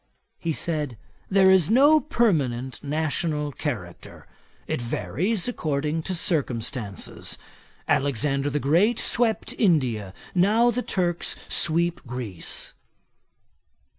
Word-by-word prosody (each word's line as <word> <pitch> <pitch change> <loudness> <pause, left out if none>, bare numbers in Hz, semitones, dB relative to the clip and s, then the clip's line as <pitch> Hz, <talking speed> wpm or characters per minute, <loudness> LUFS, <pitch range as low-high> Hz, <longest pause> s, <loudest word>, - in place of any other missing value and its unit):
He 165 - -2
said, 150 -6 -2 0.3
'there 190 -1 +5
is 190 -3 +4
no 285 +7 +6
permanent 145 - 0
national 150 0 -1
character; 130 - -6 0.4
it - - -2
varies 145 - -1
according 155 -7 -1
to 185 +3 -3
circumstances. 120 - -2 0.5
Alexander 140 +1 +1
the 145 +1 -1
Great 175 - +3
swept 230 -2 +1
India: 125 - +1 0.2
now 215 +6 +4
the 245 +2 -1
Turks 175 -6 -1
sweep 170 +1 +1
Greece.' 120 -8 -4
155 Hz, 100 wpm, -25 LUFS, 130-190 Hz, 0.5 s, no